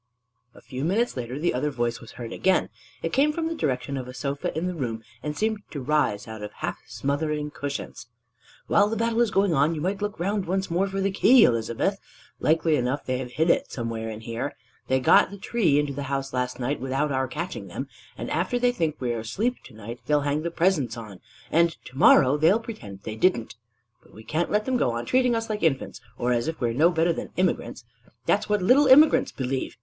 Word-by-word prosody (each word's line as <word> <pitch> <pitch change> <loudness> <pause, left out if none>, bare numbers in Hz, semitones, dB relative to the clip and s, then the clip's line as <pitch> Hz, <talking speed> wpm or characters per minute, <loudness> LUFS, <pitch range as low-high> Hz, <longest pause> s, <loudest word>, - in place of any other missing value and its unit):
A - - -15
few 130 +1 -6
minutes 210 +9 +1
later 125 0 -4
the 170 +4 0
other 130 +4 0
voice 120 -3 -2
was 115 - -12
heard 115 -2 -7
again: 190 -1 +2 0.3
it 165 - -2
came 285 +3 +4
from 325 +1 -2
the 330 - -2
direction 135 - -2
of 130 -1 -5
a 125 - -9
sofa 140 +2 -3
in 165 - -1
the 180 - -2
room, 115 -8 -4 0.2
and 150 0 -4
seemed 220 -1 0
to 145 - -6
rise 130 -7 0
out 110 -1 -8
of 105 - -6
half - - -4
smothering 150 +1 -2
cushions: 140 -5 -6 0.6
"While 205 0 +3
the 225 - -2
battle 230 +1 +1
is 235 - +3
going 195 -3 +2
on, 155 +3 +2
you 150 - -4
might 195 +4 -2
look 205 -2 -3
around 195 +1 -1
once 190 0 -1
more 185 +4 +1
for 195 0 -3
the 195 +1 +1
key, 240 +5 +6
Elizabeth. 115 - +1 0.4
Likely 160 0 +2
enough 130 +3 -1
they 130 0 -1
have 130 - -4
it 125 - -16
hid 160 +4 +2
somewhere 115 -2 -4
in 110 0 -7
here. 115 +5 -4 0.3
They 130 - +2
got 130 - +5
the 200 - -9
Tree 195 -7 +1
into 145 -1 0
the 140 - -5
house 135 -1 -2
last 125 0 -2
night 130 +4 -1
without 135 +3 -1
our 130 -1 0
catching 155 - -5
them. 130 +10 -5 0.3
And 120 - -5
after 180 +9 0
they 245 0 +3
think 165 -10 -1
we 125 -2 -1
are 115 - -3
asleep 210 - -1
to 130 - -13
night, 115 +3 -8
they'll 150 -1 +3
hang 145 +1 0
the 170 - -2
presents 165 - +1
on, 105 -5 -9 0.3
and 170 0 +3
to 130 - -12
morrow 135 +1 +6
they'll 165 +9 +4
pretend 110 - -9
they 110 - -5
didn't. 115 -3 +1 0.5
But - - -21
we 110 - -11
can't 155 +9 -1
let 210 +1 +1
them 260 -1 +1
go 120 - +1
on 120 0 -3
treating 250 - +2
us 225 0 -2
like 215 -1 -3
infants, 135 -6 0 0.2
or 125 +1 +1
as 120 +2 0
if 160 - -3
we 120 - +1
were - - -2
no 155 +8 +4
better 170 0 +2
than - - -6
immigrants. 185 0 -1 0.4
That's 210 +1 +1
what 210 -2 +1
little 265 +8 +5
immigrants 295 +4 +6
believe! 130 0 -3
150 Hz, 230 wpm, -25 LUFS, 125-195 Hz, 0.6 s, key